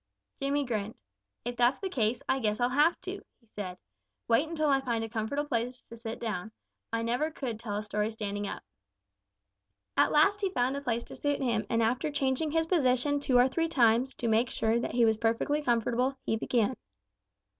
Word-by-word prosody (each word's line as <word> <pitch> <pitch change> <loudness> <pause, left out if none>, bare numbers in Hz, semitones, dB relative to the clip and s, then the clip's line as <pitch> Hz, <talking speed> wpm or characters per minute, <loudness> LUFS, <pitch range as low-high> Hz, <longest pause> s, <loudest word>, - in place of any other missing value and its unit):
Jimmy 280 +1 +1
grinned. 220 -3 -3 0.5
"If 245 0 -3
that's 245 +2 +4
the 390 - -3
case, 235 - 0
I 265 - +2
guess 215 -3 0
I'll 245 0 +2
have 300 +6 +3
to," - - -6 0.3
said 185 -3 -5
he. 100 - -52
"Wait 275 +8 +3
until 310 -2 0
I 270 -1 +3
find 235 -4 -1
a 225 - -4
comfortable 235 +7 -2
place 245 -1 -2
to 230 - -9
sit 230 0 -6
down. 220 -2 -3 0.4
I 230 0 -1
never 245 +7 0
could 255 -8 -5
tell 215 -3 -4
a 210 - -3
story 210 0 -1
standing 205 -2 -4
up." - - -6 1.3
At - - +4
last 395 +7 +4
he 390 - +1
found 260 -6 0
a 280 - -3
place 235 -3 -1
to - - -11
suit 290 -1 -1
him 230 -4 0
and 230 0 +2
after 250 +7 +1
changing 285 +1 0
his 325 +1 +1
position 285 -4 +2
two 265 -3 +2
or 245 +1 +6
three 330 +5 0
times 250 -3 +3
to 235 - -3
make 225 +3 +3
sure 225 -3 +1
that - - -3
he 240 -1 +4
was 220 -1 +3
perfectly 230 +7 +1
comfortable, 245 +1 +1
he - - +1
began. 235 +1 +1
245 Hz, 200 wpm, -30 LUFS, 225-280 Hz, 1.3 s, or